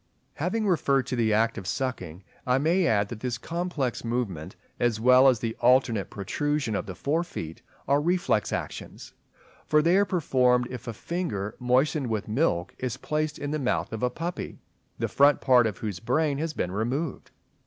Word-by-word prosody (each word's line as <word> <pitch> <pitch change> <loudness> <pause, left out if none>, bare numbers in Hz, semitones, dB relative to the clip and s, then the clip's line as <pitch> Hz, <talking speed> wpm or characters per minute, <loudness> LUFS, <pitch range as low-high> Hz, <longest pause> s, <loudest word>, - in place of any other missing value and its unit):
Having 190 +8 -1
referred 140 -8 +2
to - - -3
the 115 -2 +1
act 115 +2 +2
of 95 - -9
sucking, 95 -9 -3 0.2
I 125 +1 +3
may 170 +5 +2
add 100 -2 +2
that 115 - -7
this 120 -1 -3
complex 165 -6 -3
movement, 115 -10 -3 0.2
as 120 -3 +1
well 125 +3 +6
as 130 -3 +5
the 115 -1 -2
alternate 120 -5 +3
protrusion 145 +5 -2
of 100 - -3
the 95 - -6
fore 155 - 0
feet, 80 - -7 0.3
are 140 +1 +3
reflex 175 -9 +1
actions; - - -6 0.5
for 150 0 +4
they 170 +3 +4
are 200 - +4
performed 125 -9 +2
if 125 -1 -8
a 115 - -3
finger 110 - -3
moistened 130 +3 +2
with 110 -3 -2
milk 105 - 0
is 125 -3 -3
placed 155 0 -2
in 145 - -4
the 155 - -1
mouth 125 -4 -1
of 110 - -4
a 125 - +2
puppy, 170 +7 -5 0.4
the - - -1
front 145 0 +4
part 125 -4 +5
of 105 -4 -4
whose 105 -5 -4
brain 140 +4 0
has 160 0 -2
been 90 - -2
removed. 125 - -3
125 Hz, 185 wpm, -26 LUFS, 110-150 Hz, 0.5 s, well